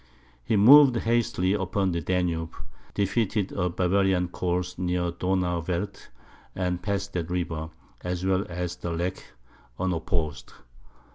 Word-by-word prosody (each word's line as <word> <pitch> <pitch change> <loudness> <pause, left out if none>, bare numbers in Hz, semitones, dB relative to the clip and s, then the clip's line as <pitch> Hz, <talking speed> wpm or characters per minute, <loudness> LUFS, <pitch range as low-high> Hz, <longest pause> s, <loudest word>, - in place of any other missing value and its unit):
He 110 - 0
moved 130 +5 +8
hastily 115 -5 +1
upon 95 -1 0
the 85 -1 -2
Danube, 85 -2 -1 0.4
defeated 100 0 0
a 90 - -1
Bavarian 90 0 +1
corps 90 0 -2
near 90 -1 0
Donauwerth, 90 0 -2 0.5
and 90 -1 -1
passed 100 0 -2
that 85 -1 -3
river, 80 -3 -2 0.3
as 90 0 -3
well 95 0 +2
as 90 0 -4
the 85 - -5
Lech, 90 +3 -3 0.6
unopposed. 80 -6 -2
90 Hz, 120 wpm, -26 LUFS, 85-95 Hz, 0.6 s, moved